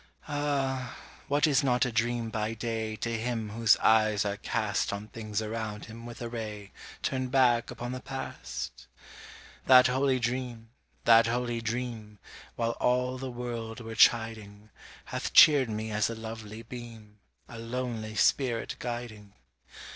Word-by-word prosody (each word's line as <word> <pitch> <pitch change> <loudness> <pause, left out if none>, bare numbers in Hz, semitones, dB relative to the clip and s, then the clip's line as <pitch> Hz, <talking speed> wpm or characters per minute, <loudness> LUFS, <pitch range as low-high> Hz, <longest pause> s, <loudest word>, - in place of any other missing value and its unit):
Ah! 140 -4 -1 0.3
what 145 +2 +3
is 140 -4 +3
not 125 -1 +3
a 125 - -2
dream 115 0 0
by 110 +1 -2
day 110 -1 -3
To 115 +1 -3
him 115 -2 -3
whose 115 0 +4
eyes 110 -2 +3
are 100 0 -2
cast 105 -3 -1
On 100 +1 -5
things 110 -1 -4
around 110 -1 -4
him 115 +1 -10
with 120 0 -8
a - - -3
ray 105 -3 -6 0.3
Turned 130 -1 -1
back 125 -3 +3
upon 120 +1 -5
the 130 - -4
past? 135 +1 -6 0.8
That 130 -1 +8
holy 130 +1 +2
dream 120 -2 -3 0.3
that 115 0 +6
holy 120 0 -1
dream, 115 -2 -4 0.4
While 115 0 0
all 125 +1 +1
the 130 0 -4
world 120 -2 -5
were 115 -1 -7
chiding, 110 -2 +2 0.3
Hath - - -4
cheered 140 -5 +8
me 110 0 -3
as 105 +1 +1
a 115 - -4
lovely 110 0 -8
beam, 115 -3 -10 0.3
A 115 - -9
lonely 115 -2 -4
spirit 120 -1 +1
guiding. 115 -4 -6
115 Hz, 145 wpm, -29 LUFS, 110-125 Hz, 0.8 s, That